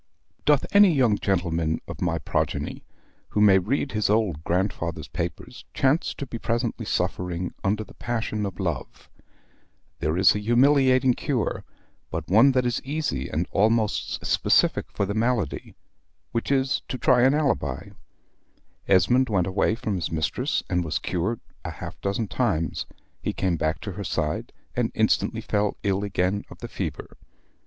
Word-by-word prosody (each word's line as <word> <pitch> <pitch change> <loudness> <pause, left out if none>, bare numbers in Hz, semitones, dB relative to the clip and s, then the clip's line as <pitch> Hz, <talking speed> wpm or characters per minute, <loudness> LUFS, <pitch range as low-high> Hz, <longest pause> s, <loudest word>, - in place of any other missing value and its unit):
Doth 145 -2 +4
any 200 -2 +7
young 125 -9 +3
gentleman 85 -4 0
of - - -8
my - - +1
progeny, - - -2 0.5
who - - -1
may 100 -2 +6
read 135 +8 -1
his 105 -1 0
old 105 -8 +1
grandfather's 85 -2 -1
papers, - - -5
chance 140 +5 +2
to 140 - -5
be 120 -3 -6
presently 115 0 -2
suffering 90 0 -2
under 105 +2 0
the - - -15
passion 115 -3 -3
of 95 -1 -8
Love? 85 -9 -4 0.9
There 80 +2 0
is 95 +1 +6
a 105 - -2
humiliating 130 +3 +4
cure, 125 -2 -2 0.4
but 80 0 -4
one 115 +7 +6
that 130 -1 +2
is 120 -1 0
easy 135 - -2
and 80 +5 -1
almost 110 +1 +1
specific - - +3
for 100 - -1
the 100 - -2
malady 110 - -1 0.6
which 115 +3 -2
is, 135 -1 +1
to 130 - -4
try 125 -1 +4
an 130 +3 +5
alibi. 105 - -1 1.0
Esmond 120 +8 +4
went 95 -5 +2
away 95 +3 +1
from 110 -2 -3
his 90 -3 -2
mistress 80 -3 -1
and 90 0 0
was 80 - -1
cured 95 +6 -2 0.2
a - - -4
half - - -8
dozen 100 +3 -1
times; 95 -9 -1 0.3
he - - -2
came 90 -2 0
back 80 0 -1
to 100 - -5
her 100 +2 -6
side, 75 -4 -2 0.2
and - - 0
instantly - - +1
fell 105 0 0
ill 100 -1 0
again 100 0 0
of - - -11
the - - -7
fever. - - -6
105 Hz, 160 wpm, -25 LUFS, 90-125 Hz, 1.0 s, any